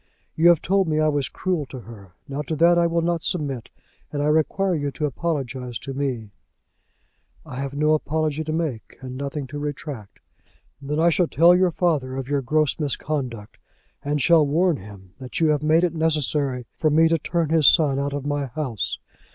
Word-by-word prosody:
You 165 Hz, +2 st, +4 dB
have 170 Hz, -3 st, +4 dB
told 195 Hz, 0 st, +2 dB
me 155 Hz, -1 st, +1 dB
I 155 Hz, 0 st, +3 dB
was 145 Hz, -3 st, -1 dB
cruel 175 Hz, -7 st, -2 dB
to 130 Hz, -1 st, -9 dB
her. 100 Hz, -6 st, -13 dB
Now 140 Hz, +1 st, -4 dB
to 155 Hz, +2 st, -3 dB
that 170 Hz, +3 st, +5 dB
I 170 Hz, -, +3 dB
will 170 Hz, 0 st, 0 dB
not 170 Hz, -1 st, 0 dB
submit, 140 Hz, -10 st, -3 dB, 0.4 s
and 145 Hz, -1 st, -2 dB
I 150 Hz, -, +2 dB
require 180 Hz, +5 st, +1 dB
you 145 Hz, -3 st, -1 dB
to 150 Hz, -, -2 dB
apologize 130 Hz, -5 st, -3 dB
to 135 Hz, -, -7 dB
me." 130 Hz, -6 st, -3 dB, 1.1 s
"I 125 Hz, -, -8 dB
have 140 Hz, +1 st, -4 dB
no 150 Hz, +1 st, +2 dB
apology 155 Hz, 0 st, -1 dB
to 155 Hz, -, -3 dB
make, 155 Hz, -8 st, -3 dB
and 130 Hz, -1 st, -7 dB
nothing 140 Hz, +1 st, -4 dB
to 145 Hz, +2 st, -7 dB
retract." 145 Hz, -7 st, -6 dB, 0.6 s
"Then 150 Hz, +2 st, -2 dB
I 170 Hz, +1 st, +4 dB
shall 175 Hz, +1 st, +2 dB
tell 170 Hz, +3 st, +5 dB
your 185 Hz, 0 st, +3 dB
father 155 Hz, -7 st, 0 dB
of 135 Hz, -2 st, -4 dB
your 145 Hz, 0 st, 0 dB
gross 150 Hz, +4 st, +1 dB
misconduct, 135 Hz, -7 st, -3 dB, 0.4 s
and 145 Hz, +1 st, -1 dB
shall 160 Hz, +3 st, +5 dB
warn 165 Hz, +2 st, +2 dB
him 95 Hz, -3 st, -13 dB
that 130 Hz, -1 st, -5 dB
you 160 Hz, -2 st, +3 dB
have 150 Hz, -1 st, +2 dB
made 155 Hz, +3 st, +3 dB
it 175 Hz, -, +1 dB
necessary 150 Hz, -5 st, 0 dB
for 155 Hz, -, +3 dB
me 160 Hz, +2 st, +5 dB
to 165 Hz, 0 st, +1 dB
turn 165 Hz, +1 st, -1 dB
his 160 Hz, -3 st, +4 dB
son 145 Hz, -5 st, +4 dB
out 140 Hz, 0 st, -2 dB
of 145 Hz, -1 st, -4 dB
my 145 Hz, -1 st, -1 dB
house. 130 Hz, -5 st, -3 dB
150 Hz, 200 wpm, -23 LUFS, 135-160 Hz, 1.1 s, that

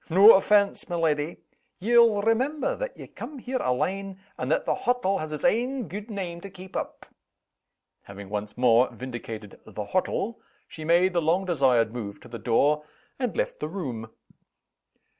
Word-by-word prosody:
"No 195 Hz, +7 st, +9 dB
offense, 200 Hz, +1 st, +3 dB
my 175 Hz, -, -2 dB
leddy! 160 Hz, -1 st, 0 dB, 0.4 s
Ye'll 230 Hz, 0 st, +4 dB
remember 270 Hz, -, +1 dB
that -, -, -5 dB
ye -, -, -8 dB
cam' 295 Hz, -, -9 dB
here 255 Hz, +1 st, -3 dB
alane, 190 Hz, +10 st, -1 dB, 0.2 s
and -, -, -4 dB
that -, -, +1 dB
the -, -, +2 dB
hottle 245 Hz, -6 st, 0 dB
has 155 Hz, 0 st, -5 dB
its 150 Hz, -, -5 dB
ain 250 Hz, +1 st, +1 dB
gude 205 Hz, +3 st, -7 dB
name 180 Hz, -5 st, -5 dB
to 200 Hz, -, -8 dB
keep 185 Hz, 0 st, -12 dB
up." -, -, -4 dB, 1.0 s
Having 100 Hz, 0 st, -10 dB
once 105 Hz, +1 st, -4 dB
more 125 Hz, 0 st, +5 dB
vindicated 115 Hz, -5 st, -7 dB
"the 105 Hz, -, -6 dB
hottle," 195 Hz, -, -1 dB, 0.3 s
she 155 Hz, -, -9 dB
made 175 Hz, +3 st, +3 dB
the 170 Hz, -, +2 dB
long 170 Hz, +5 st, +1 dB
desired 130 Hz, -9 st, +2 dB
move 105 Hz, -5 st, -6 dB
to -, -, -13 dB
the 115 Hz, -1 st, -8 dB
door, 145 Hz, +7 st, +2 dB, 0.4 s
and 250 Hz, -, -2 dB
left -, -, -1 dB
the 150 Hz, -, -3 dB
room. 130 Hz, -, -5 dB
175 Hz, 165 wpm, -26 LUFS, 125-210 Hz, 1.0 s, No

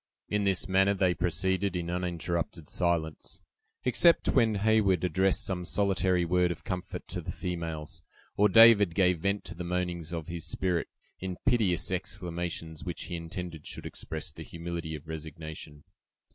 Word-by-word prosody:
In 105 Hz, -1 st, +1 dB
this 95 Hz, -2 st, +1 dB
manner 95 Hz, +1 st, +3 dB
they 95 Hz, -2 st, +3 dB
proceeded 95 Hz, +3 st, 0 dB
in 85 Hz, -1 st, -2 dB
uninterrupted 85 Hz, -2 st, -3 dB
silence, 85 Hz, -3 st, -1 dB, 0.4 s
except 165 Hz, +7 st, +4 dB
when 115 Hz, -5 st, +3 dB
Heyward 100 Hz, -4 st, +3 dB
addressed 95 Hz, +1 st, +2 dB
some 90 Hz, -2 st, -2 dB
solitary 95 Hz, -2 st, +1 dB
word 90 Hz, +1 st, +3 dB
of 85 Hz, -, -5 dB
comfort 90 Hz, -2 st, -5 dB
to -, -, -4 dB
the -, -, -5 dB
females, 80 Hz, -3 st, -4 dB, 0.3 s
or 105 Hz, +1 st, +4 dB
David 105 Hz, -5 st, +7 dB
gave 90 Hz, -3 st, +3 dB
vent 100 Hz, +3 st, 0 dB
to -, -, -6 dB
the 90 Hz, -, -6 dB
moanings 85 Hz, -2 st, -2 dB
of 85 Hz, -3 st, -4 dB
his 85 Hz, -2 st, -5 dB
spirit, 90 Hz, -3 st, 0 dB, 0.3 s
in 95 Hz, -1 st, -4 dB
piteous 95 Hz, -8 st, +2 dB
exclamations, 85 Hz, -3 st, -4 dB
which 90 Hz, -2 st, -5 dB
he 90 Hz, -, -5 dB
intended 85 Hz, -1 st, -6 dB
should -, -, -7 dB
express 80 Hz, +2 st, -6 dB
the 75 Hz, -, -11 dB
humility 85 Hz, 0 st, -5 dB
of 75 Hz, +1 st, -10 dB
resignation. 80 Hz, -1 st, -8 dB
90 Hz, 155 wpm, -29 LUFS, 85-95 Hz, 0.4 s, David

